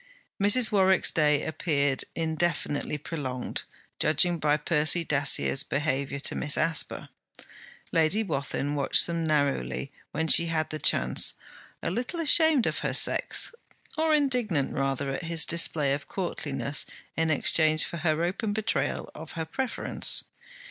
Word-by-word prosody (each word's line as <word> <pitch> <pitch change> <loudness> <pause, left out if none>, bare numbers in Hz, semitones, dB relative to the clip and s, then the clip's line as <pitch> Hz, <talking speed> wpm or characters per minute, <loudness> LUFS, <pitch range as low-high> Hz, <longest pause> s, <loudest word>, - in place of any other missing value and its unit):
Mrs. 220 +4 +5
Warwick's 190 -2 +3
day 150 -2 +1
appeared 145 -4 0
indefinitely 160 -2 -2
prolonged, 135 -5 -5 0.4
judging 165 +3 +1
by 150 0 +1
Percy 155 +2 +1
Dacier's 140 -2 +3
behaviour 140 -1 -2
to - - 0
Miss 150 -1 0
Asper. 165 -1 +1 0.8
Lady 165 +7 +2
Wathin 140 -4 -3
watched 140 -2 +3
them 170 -1 -3
narrowly 140 - -1 0.2
when 160 - -3
she 170 +1 +5
had 155 -1 -2
the 155 - -5
chance, 65 - +2 0.5
a - - -1
little 245 - -3
ashamed 315 -4 +4
of - - -2
her - - -3
sex, - - +3 0.4
or 315 0 0
indignant 245 - 0
rather 135 0 -2
at 150 +6 -5
his 165 -1 +2
display 155 -4 +2
of 140 0 -5
courtliness 145 -6 -2 0.3
in 165 0 0
exchange 155 +1 +2
for 170 - -7
her 160 0 0
open 205 +4 -2
betrayal 205 -10 -2
of 160 0 -10
her 165 -1 -4
preference. 250 +9 -2
160 Hz, 135 wpm, -27 LUFS, 145-175 Hz, 0.8 s, Mrs